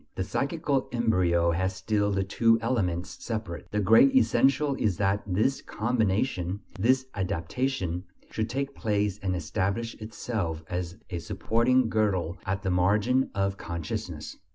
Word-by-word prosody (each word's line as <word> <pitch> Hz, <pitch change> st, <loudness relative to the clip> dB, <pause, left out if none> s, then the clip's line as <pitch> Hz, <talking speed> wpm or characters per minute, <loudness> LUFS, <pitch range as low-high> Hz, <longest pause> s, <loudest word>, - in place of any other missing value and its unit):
The 95 Hz, -, -1 dB
psychical 140 Hz, -, -1 dB
embryo 90 Hz, -8 st, +2 dB
has 95 Hz, +2 st, -1 dB
still 105 Hz, +2 st, 0 dB
the 95 Hz, -1 st, +1 dB
two 115 Hz, +4 st, +3 dB
elements 95 Hz, -8 st, -2 dB
separate. 110 Hz, -8 st, -4 dB
The 105 Hz, -, -1 dB
great 115 Hz, -, +6 dB
essential 140 Hz, -, +3 dB
is 100 Hz, -6 st, +1 dB
that 100 Hz, 0 st, +1 dB
this 110 Hz, +9 st, +1 dB
"combination," 105 Hz, -4 st, -1 dB, 0.2 s
this 130 Hz, +5 st, +3 dB
"adaptation," 95 Hz, +1 st, -2 dB, 0.3 s
should 110 Hz, 0 st, -2 dB
take 140 Hz, +3 st, -2 dB
place 105 Hz, -3 st, -1 dB
and 95 Hz, -2 st, -1 dB
establish 95 Hz, +7 st, -2 dB
itself 110 Hz, -7 st, -3 dB
as 90 Hz, +1 st, -3 dB
a 85 Hz, -, -2 dB
supporting 115 Hz, +7 st, +2 dB
girdle 100 Hz, -5 st, 0 dB
at 95 Hz, +1 st, -1 dB
the 95 Hz, -, 0 dB
margin 105 Hz, +9 st, +2 dB
of 100 Hz, 0 st, 0 dB
consciousness. 85 Hz, -3 st, -5 dB
105 Hz, 135 wpm, -27 LUFS, 90-115 Hz, 0.3 s, great